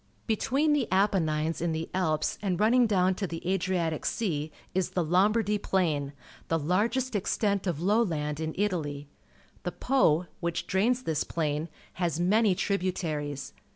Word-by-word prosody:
Between 270 +7 +1
the 280 -5 +1
Apennines 165 -6 +1
and 165 -2 0
the 160 +1 -3
.Ups 160 -5 0
and 190 -4 -1
running 235 +3 +4
down 190 -3 +3
to 195 +1 -3
the 165 0 -6
Adriatic 180 -4 0
Sea, 160 -9 -1 0.2
is 185 -1 0
the 180 -3 -1
Lomhardij 205 +4 +2
Plain 150 -7 0 0.2
— - - -22
the 165 - +1
largest 215 - 0
extent 200 0 0
of 170 -5 -1
low 210 +5 +4
land 150 -7 -1
in 160 0 -3
Italy. 155 -8 -2 0.5
The 180 - -3
Po, 180 - +2 0.2
wMch 170 0 -2
drains 240 +7 +1
tliis 155 - -1
plain, 155 0 -1 0.2
has 170 -3 -1
many 200 +2 +3
tributaries. 165 -8 -2
180 Hz, 155 wpm, -28 LUFS, 160-205 Hz, 0.5 s, running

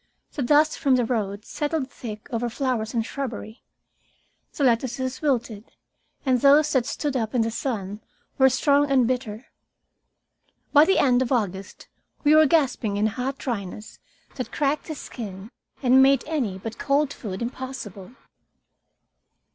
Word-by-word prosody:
The 290 - -4
dust 295 +4 +3
from 275 -4 +3
the 245 -2 +2
road 210 -3 -2
settled 295 -3 -3
thick 215 -3 -8
over 235 +1 -1
flowers 240 -2 -2
and 225 -1 0
shrubbery. 235 -3 -6 0.9
The 285 - -2
lettuces 255 +1 0
wilted, 240 -7 -2 0.5
and 255 -3 +2
those 295 +2 +5
that 255 -3 +2
stood 290 -3 -3
up 230 -1 -2
in 235 - +3
the 225 - -2
sun 210 -4 -4 0.4
were 265 0 +7
strong 285 +2 +2
and 265 -3 +4
bitter. 240 -2 -3 1.3
By 295 +1 +8
the 385 - +3
end 250 -2 +4
of 260 - -1
August 200 -6 -2 0.4
we 295 0 +5
were 310 0 +7
gasping 265 -9 +1
in 210 - +1
a - - +3
hot 260 +4 -3
dryness 210 -4 -6 0.4
that 255 - -4
cracked 290 0 -1
the 310 - -5
skin 205 -5 -8 0.3
and 260 +1 +6
made 270 -1 +4
any 265 -12 -2
but 225 +3 -7
cold 285 0 +1
food 195 -5 -6
impossible. 235 -5 -6
250 Hz, 150 wpm, -24 LUFS, 220-275 Hz, 1.3 s, By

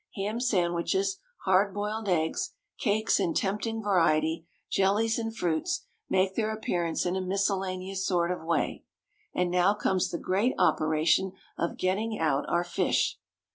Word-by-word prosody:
Ham 210 +3 -2
sandwiches, 240 - +1 0.3
hard 190 +1 +3
boiled 210 +1 -2
eggs, 165 - 0 0.2
cakes 220 -2 +2
in 175 -4 0
tempting 210 +3 -1
variety, 165 -4 +2 0.2
jellies 210 +4 +2
and 225 0 -4
fruits, 175 - -1 0.2
make 190 0 +2
their 220 -1 0
appearance 175 -6 -1
in 180 +1 0
a 190 - -1
miscellaneous 190 0 -1
sort 175 -2 +1
of 180 - -4
way. 165 +1 -1 0.5
And 180 -1 +1
now 180 +3 +3
comes 190 -3 +1
the 170 - -3
great 200 +10 +1
operation 160 +4 +2 0.2
of 170 - -2
getting 210 +4 0
out 150 -3 0
our 175 0 +2
fish. 175 - 0
190 Hz, 140 wpm, -28 LUFS, 175-210 Hz, 0.5 s, hard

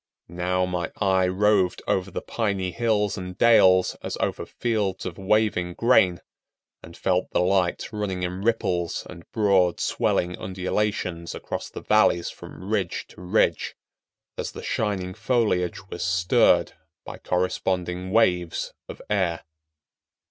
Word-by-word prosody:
Now 90 +1 0
my 90 -2 -3
eye 95 -2 +3
roved 95 -1 +2
over 95 0 0
the - - -5
piny 100 -5 -1
hills 105 -3 0
and 90 0 -7
dales 95 -6 +5
as - - -4
over - - -2
fields 105 -5 -2
of 90 0 -6
waving 95 -3 +1
grain, 95 -8 +3 0.6
and 85 - -12
felt 90 -1 0
the - - +1
light 90 -1 +1
running 100 -4 -3
in 90 +1 -3
ripples 90 -6 0
and 85 - -12
broad 95 -5 +3
swelling 90 0 0
undulations 95 -2 -2
across - - -5
the - - -9
valleys 85 -1 +3
from 95 - -11
ridge 100 -5 -1
to - - -14
ridge, 90 0 +1 0.6
as - - -4
the - - -8
shining 95 -4 -2
foliage 100 -6 0
was 85 - -4
stirred 90 -1 +3 0.3
by - - -8
corresponding 90 0 -1
waves 90 -5 +1 0.2
of - - -9
air. 95 -5 0
95 Hz, 135 wpm, -25 LUFS, 90-105 Hz, 0.6 s, dales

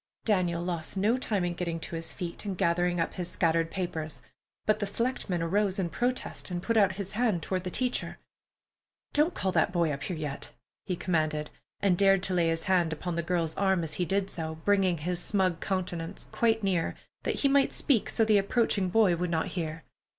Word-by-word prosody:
Daniel 175 -5 +2
lost 175 0 -4
no 210 +5 +3
time 210 -7 -1
in 175 - -1
getting 170 -1 -3
to 165 - -5
his 165 0 -3
feet 175 -3 -5
and 195 -3 -4
gathering 175 +1 +1
up 165 - 0
his 180 -1 -3
scattered 165 -1 +1
papers, 165 -5 -4 0.5
but 215 0 +2
the 205 - -1
selectman 205 -5 -1
arose 195 +3 +1
in 180 -4 -1
protest 250 -3 -2
and 175 -1 -3
put 230 - 0
out 200 -4 +5
his 195 -1 -4
hand 215 -7 +1
toward 185 +1 -2
the 185 - -3
teacher. 250 +6 -1 1.0
"Don't 305 +4 +3
call 190 - 0
that 190 - +2
boy 170 -3 +2
up 140 -1 -4
here 180 +2 -3
yet," 150 -3 -5 0.3
he 185 - 0
commanded, 155 -4 -1 0.3
and 190 -3 +3
dared 195 -1 +5
to 190 - +1
lay 170 -2 +3
his 165 0 0
hand 180 -4 +2
upon 175 +3 -3
the 170 - 0
girl's 170 -2 -1
arm 190 -3 +2
as 160 - -3
he 180 - 0
did 195 +1 0
so, 160 -1 -3
bringing 195 -4 +3
his 175 +3 -2
smug 185 -5 +1
countenance 180 -2 -3
quite 225 -2 +2
near, 185 -4 0 0.3
that - - -2
he 280 - +4
might 275 0 +4
speak 250 -8 +1
so 225 - +2
the 215 -2 +5
approaching 200 -2 +1
boy 195 -2 +4
would 175 +1 -2
not 165 +2 0
hear. 165 -3 -4
180 Hz, 205 wpm, -29 LUFS, 170-200 Hz, 1.0 s, out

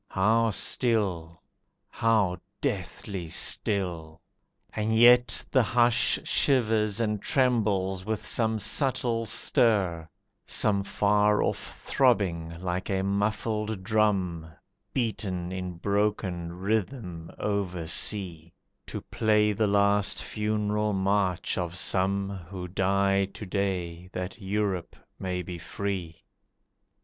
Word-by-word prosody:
How 110 +4 +2
still! 95 -7 -1 0.5
How 110 -6 +2 0.2
deathly 95 -1 -4
still! 85 -2 0 0.5
And 110 +1 -1
yet 120 0 +6
the 130 - +5
hush 120 +1 +3
Shivers 110 -5 +2
and 105 -3 -1
trembles 105 -8 +1
with 110 +1 -3
some 110 -1 +1
subtle 120 -1 +1
stir, 95 -11 +1 0.4
Some 100 -3 +2
far 105 +1 +2
off - - -3
throbbing 85 -10 +1
like 90 0 -3
a 95 -1 0
muffled 105 +1 -1
drum, 95 -6 +1 0.4
Beaten 95 -7 -2
in 90 -1 -4
broken 100 -3 -1
rhythm 95 -3 -3
oversea, 90 -3 -2 0.3
To - - -5
play 105 -1 +2
the 105 +1 +1
last 100 0 +2
funereal 105 0 -1
march 95 -2 0
of 90 0 -4
some 95 +2 +1 0.2
Who 90 -2 -6
die 100 +1 +1
to 100 +2 -9
day 90 -3 -3
that 90 +4 -5
Europe 95 -3 -2 0.2
may 90 -1 -3
be 90 -1 -7
free. 90 -2 -5
100 Hz, 100 wpm, -27 LUFS, 90-110 Hz, 0.5 s, yet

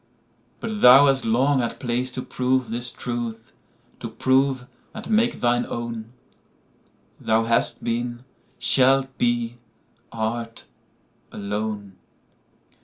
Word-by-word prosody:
But 220 -2 -4
thou 130 +3 +9
hast 135 -2 +2
long 130 +5 +2
had 120 -2 -3
place 125 +1 -1
to 130 - -4
proveThis 125 -2 0
truth—to 120 -2 -7
prove, 130 -1 +1 0.3
and - - -7
make 230 +2 +2
thine 120 0 +2
own:Thou 115 -1 -6
hast 115 0 0
been, 120 +1 -3 0.3
shalt 135 0 +3
be, 120 0 0 0.5
art, 115 +1 -4 0.7
alone. 105 -1 -5
120 Hz, 95 wpm, -23 LUFS, 115-130 Hz, 0.7 s, thou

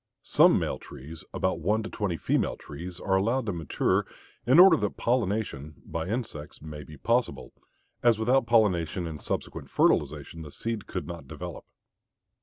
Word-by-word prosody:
Some - - +5
male - - -2
trees, 75 +5 -10
about 95 -2 -1
one 105 +7 +1
to 110 - -5
twenty 100 -6 -2
female - - 0
trees, 85 +4 -8
are 95 - +1
allowed 115 +7 +1
to 100 - -1
mature 80 -4 0 0.4
in 130 +5 +6
order 180 -1 +10
that 105 -3 -2
pollination, 105 - -1
by 85 0 -4
insects, 100 -9 -4
may 75 -1 -8
be 75 -1 -12
possible, 115 - 0 0.5
as 120 -3 +4
without 120 +3 +2
pollination 90 -7 +2
and 80 -2 -6
subsequent - - -4
fertilization 75 +3 +1
the 75 - -8
seed 115 +6 -4
could 90 - -4
not 85 -5 -8
develop. - - -7
95 Hz, 160 wpm, -28 LUFS, 80-115 Hz, 0.5 s, order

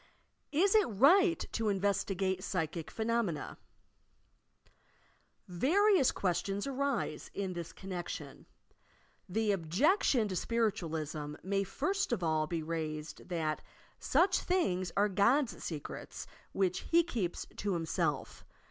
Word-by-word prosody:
IS 370 +7 +3
IT 430 -3 +5
RIGHT 335 - +4
TO 225 -2 0
INVESTIGATE 195 -1 0
PSTCHIC 165 -4 -3
PHENOMENA 220 -8 -1
t - - -39 0.8
Various 320 - +4
questions 195 +2 -1
arise 275 - -2
in 195 -2 -2
this 170 -2 -6
connectioQ: 185 -3 -6 0.8
The 215 +3 +1
objection 215 - +2
to 185 - -3
Spiritualism 160 -9 -1
may 195 +2 0
first 300 - -1
of 200 -7 0
all 155 -1 +1
be 165 0 -2
raised 155 0 -5
that 160 -3 -1 0.4
"such 370 0 +3
things 185 - 0
are 205 +1 +4
God's 235 +7 +2
secrets 155 -4 -6 0.3
which 185 -2 +1
He 340 +1 +3
keeps 220 - -3
to 200 -1 -1
Himself. 165 -2 -2
195 Hz, 110 wpm, -33 LUFS, 170-260 Hz, 0.8 s, IT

